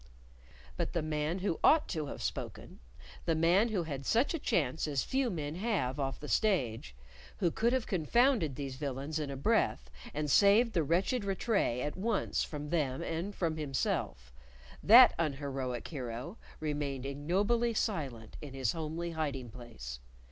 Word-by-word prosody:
But - - -2
the 170 - 0
man 155 +2 -1
who 170 - 0
ought 310 0 +5
to 155 -5 -2
have - - -6
spoken - - -5 0.5
the 165 - +2
man 175 +8 +4
who 195 -6 0
had 140 -4 -5
such 235 - +2
a 330 - -2
chance 155 - 0
as 140 -3 0
few 265 -1 0
men 150 -6 -3
have 175 - -1
off 135 -2 -2
the 150 - -7
stage 120 - 0 0.4
who 175 -3 +1
could 230 +6 +1
have 255 -2 0
confounded 195 - +2
these 135 -2 -5
villains 140 +2 -3
in 150 -2 -3
a 135 - -5
breath, - - +1 0.2
and 150 0 -2
saved 210 - +5
the 170 - +2
wretched 180 - +1
Rattray 195 - 0
at 145 - -3
once 210 +2 0
from 150 -1 -6
them 140 -6 0
and 170 +5 -3
from 160 -3 -1
himself 130 - -2 0.5
that 240 +4 +9
unheroic 135 -5 -2
hero 130 - -6 0.2
remained 145 -4 -3
ignobly 200 +12 0
silent 135 - -3
in 140 -3 -8
his 130 -4 0
homely 165 +1 -4
hiding 140 -7 -3
place. 115 - -9
155 Hz, 160 wpm, -32 LUFS, 135-195 Hz, 0.5 s, that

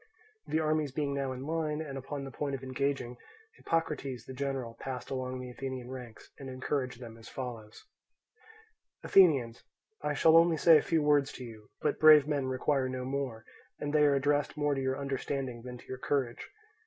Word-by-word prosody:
The 155 - +1
armies 155 -2 +1
being 140 +1 -1
now 140 -1 -2
in 130 +1 -6
line 155 -1 -1
and 150 -4 -5
upon 135 +1 -5
the 135 - -7
point 140 +2 -3
of 135 - -8
engaging, 130 -2 -2 0.4
Hippocrates, 145 -7 -2
the 130 - -8
general, 135 -3 -3
passed 130 -2 -6
along 130 -1 -3
the 125 -1 -7
Athenian 130 -1 -6
ranks, 125 -4 -10
and 135 -1 -7
encouraged 130 -1 -3
them 115 -2 -10
as 110 - -12
follows: 115 -5 -7 1.2
"Athenians, 135 -11 +4 0.4
I 150 0 -1
shall 160 +2 +5
only 165 -1 +5
say 160 -1 +7
a - - -2
few 160 -2 +1
words 145 -1 +3
to 130 - -8
you, 110 -3 -11
but - - 0
brave 155 -2 +8
men 145 -3 0
require 130 +1 0
no 130 0 -4
more, 130 -4 -3 0.3
and 145 0 -4
they 150 -1 +5
are 145 -1 +4
addressed 145 +2 +1
more 145 -1 +1
to 135 - -2
your 130 0 -1
understanding 135 -3 -3
than 125 +1 -8
to - - -16
your 130 - -7
courage. 130 -3 -2
135 Hz, 190 wpm, -31 LUFS, 125-145 Hz, 1.2 s, brave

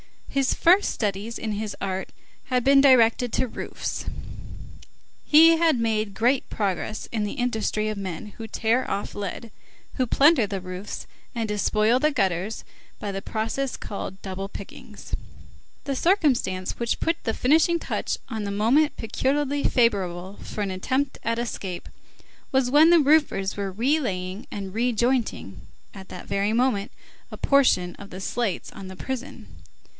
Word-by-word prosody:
His 275 -1 +1
first 365 +4 +4
studies 210 +2 -2
in 220 - -3
his 210 0 -3
art 190 -1 -3 0.3
had 255 -2 0
been 275 +1 +6
directed 245 -3 +5
to 260 - +1
roofs. - - -5 1.2
He 325 +2 +7
had 325 -4 +3
made 220 -3 0
great 245 +6 +1
progress 205 +1 -2
in 220 -2 -1
the 205 - -3
industry 220 -3 -1
of 215 - -4
the - - -4
men 185 0 -5
who 225 -1 -6
tear 230 +4 0
off 200 - -3
lead, 205 +3 -5 0.4
who 255 -2 0
plunder 275 -3 +5
the 195 -1 -4
roofs 185 +2 -6 0.3
and 230 -1 -1
despoil 215 +3 +2
the 305 +3 +2
gutters 195 - -1 0.3
by 205 - -4
the 195 0 -4
process 225 +6 -2
called 195 -1 -6
double 195 0 -5
pickings. - - -11 0.7
The 275 -2 -2
circumstance 260 - +1
which 235 -1 -1
put 330 +1 +1
the 225 - 0
finishing 315 +8 +3
touch - - -2
on 220 -4 -3
the 200 - -3
moment 240 +10 +3
peculiarly 280 +5 -1
favorable 190 -5 +1
for 210 - -5
an 200 -2 -1
attempt 260 +9 -1
at 230 0 0
escape, 195 -6 -5 0.6
was 265 -2 +2
that 295 +3 +7
the 345 -1 +7
roofers 280 -11 +2
were 200 -1 -2
re 255 +11 +1
laying 185 -5 -4
and 195 -2 -6
re 240 +3 +1
jointing, 235 - 0 0.4
at 190 -1 -10
that - - -9
very 200 +2 0
moment, 235 -4 +1 0.4
a - - -7
portion 250 -11 +3
of 200 - -11
the 185 - -8
slates 215 -1 -2
on 195 -1 -9
the 190 - -8
prison. 265 +6 -6
225 Hz, 160 wpm, -25 LUFS, 195-265 Hz, 1.2 s, He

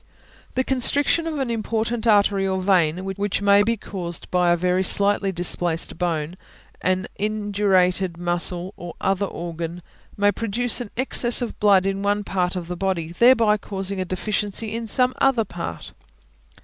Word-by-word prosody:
The 260 - +2
constriction 280 +5 +3
of 315 -2 -3
an 265 -4 -2
important 225 +1 -2
artery 200 -2 +3
or 190 0 -1
vein, 185 -2 +1
which 200 +1 -2
may 200 0 +5
be 230 +2 +1
caused 175 -4 -7
by 180 -1 +2
a 175 - +3
very 180 +1 +1
slightly 200 +1 +1
displaced 175 -2 -1
bone, 170 -1 -2 0.4
an 185 +1 0
indurated 195 -4 +1
muscle, 175 +1 -2
or 175 -1 -8
other 195 +1 0
organ, 170 0 -6 0.3
may 205 0 +3
produce 230 +3 0
an 240 - -6
excess 245 -2 +1
of 240 - -6
blood 200 -2 +4
in 195 0 -1
one 205 +1 0
part 180 -2 -1
of 175 -2 -5
the 180 - -4
body, 175 -3 -2
thereby 225 +1 +4
causing 195 -1 -4
a - - -2
deficiency 210 +3 -2
in 230 0 -4
some 250 +3 +2
other 260 -5 +3
part. 175 -3 -7
195 Hz, 160 wpm, -22 LUFS, 180-215 Hz, 0.4 s, may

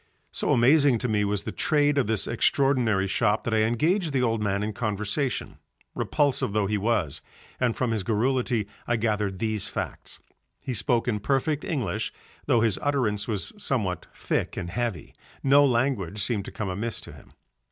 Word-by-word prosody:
So - - 0
amazing 140 +1 +5
to 125 - -2
me 105 -2 +1
was 105 0 0
the - - -4
trade 145 -2 +2
of 130 - +1
this 110 -2 +1
extraordinary 120 -4 +2
shop 105 +2 +1
that 115 - -2
I 110 - +3
engaged 155 - +1
the 130 -2 +2
old 115 -2 +1
man 100 -1 0
in 105 0 -2
conversation, 110 +5 -2 0.3
repulsive 145 -8 0
though 105 -1 +2
he 105 +2 0
was, 105 -8 0 0.4
and 125 -3 +1
from 125 -3 0
his 110 -2 0
garrulity 120 +1 0 0.2
I 120 - +2
gathered 105 -4 -1
these 110 0 -1
facts. - - -5 0.5
He 130 - -3
spoke 120 +1 +1
in 105 -4 0
perfect 140 +6 0
English 130 - -2 0.4
though 115 - +4
his 110 -3 +2
utterance 115 -8 0
was 105 -4 -3
somewhat 100 -10 -1
thick - - -2
and 85 -2 -4
heavy; 110 -7 -3 0.3
no 140 +1 +6
language 120 -8 +1
seemed 105 -1 0
to - - -7
come 105 -3 -4
amiss 105 +5 -2
to - - -10
him. - - -16
115 Hz, 175 wpm, -26 LUFS, 105-130 Hz, 0.5 s, no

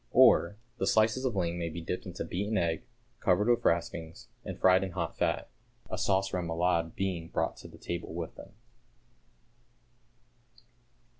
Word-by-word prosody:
Or, 85 +5 +6 0.2
the - - 0
slices 110 +4 +3
of 125 -5 0
ling 85 -2 0
may 85 -1 -2
be 85 +2 -6
dipped 90 +3 -4
into 90 -1 -5
beaten 100 +4 -1
egg, 85 -3 0 0.4
covered 100 +4 +2
with 120 -1 +3
raspings, 85 -1 -1
and - - -6
fried 95 0 +5
in 95 -2 -4
hot - - -3
fat, - - 0 0.4
a - - -2
sauce 95 0 +2
rémoulade 85 -1 0
being 90 -4 -2
brought - - -1
to - - -10
table 85 -1 -5
with 85 0 -5
them. 95 - -12
90 Hz, 150 wpm, -30 LUFS, 85-95 Hz, 0.4 s, Or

